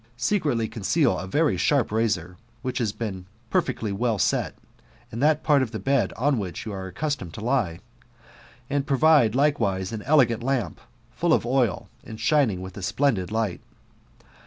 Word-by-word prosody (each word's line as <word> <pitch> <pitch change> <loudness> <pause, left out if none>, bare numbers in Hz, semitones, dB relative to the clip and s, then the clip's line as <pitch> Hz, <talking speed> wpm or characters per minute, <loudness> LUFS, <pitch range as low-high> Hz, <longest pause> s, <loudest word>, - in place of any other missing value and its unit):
Secretly 120 - 0
conceal 115 - +1
a 95 - -6
very 145 - +2
sharp 135 +4 +2
razor, 100 -6 -1 0.3
which 130 0 -2
has 115 -4 0
been 95 -5 -6 0.2
perfectly 110 -3 0
well 115 +2 0
set, 90 - 0 0.6
in 115 - -5
that 150 +2 +2
part 145 -3 +4
of 130 - -1
the 110 - -5
bed 135 +2 +1
on 135 0 +1
which 90 -5 -5
you 110 - -5
are 95 -1 -5
accustomed 95 - -4
to - - -7
lie; 115 -10 0 0.9
and 140 +1 -1
provide 140 -5 +4
likewise 115 -10 +1
an 110 -2 -5
elegant 125 -4 +3
lamp, 130 0 -2 0.3
full 170 -1 +1
of - - +2
oil, 120 -5 0 0.2
and 110 - -9
shining 115 - +2
with 95 0 -9
a - - -6
splendid 95 0 0
light. 110 -4 -1
115 Hz, 165 wpm, -25 LUFS, 100-140 Hz, 0.9 s, part